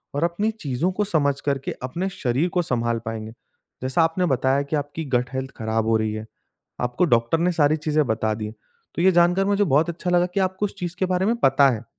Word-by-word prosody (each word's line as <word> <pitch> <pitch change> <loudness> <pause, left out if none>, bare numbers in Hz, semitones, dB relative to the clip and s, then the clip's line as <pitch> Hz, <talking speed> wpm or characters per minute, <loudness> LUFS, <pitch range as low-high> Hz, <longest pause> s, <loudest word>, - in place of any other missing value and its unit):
और 145 - 0
अपनी 190 +6 0
चीज़ों 165 - -2
को 210 +3 -1
समझ 145 -8 +1
करके 140 -2 -2
अपने 170 +9 -2
शरीर 140 +2 -1
को 180 -1 +1
संभाल 115 -5 -1
पाएँगे। 110 -1 -5 0.5
जैसा 130 +5 +1
आपने 165 +3 +1
बताया 135 -2 +2
कि 140 +2 -3
आपकी 145 +2 -3
गट 125 +1 +1
हेल्थ 130 +1 -3
खराब 110 0 -1
हो 115 0 +3
रही 110 -1 -1
है। 110 0 -5 0.6
आपको 125 +8 +1
डॉक्टर 120 +1 +2
ने 175 +2 +2
सारी 155 -3 +3
चीजें 155 -1 +1
बता 110 -1 0
दी 110 - -5
हैं, 105 - -7 0.4
तो - - -1
ये 190 +1 +5
जानकर 175 +2 +3
मुझे 205 +1 +2
बहुत 155 -1 +2
अच्छा 170 +1 -4
लगा 175 0 +3
कि - - 0
आपको 190 +1 0
उस 205 - -6
चीज़ 175 -1 -4
के 190 - +2
बारे 185 0 0
में 230 +3 +2
पता 135 - +4
है 115 -3 -3
150 Hz, 230 wpm, -23 LUFS, 125-180 Hz, 0.6 s, ये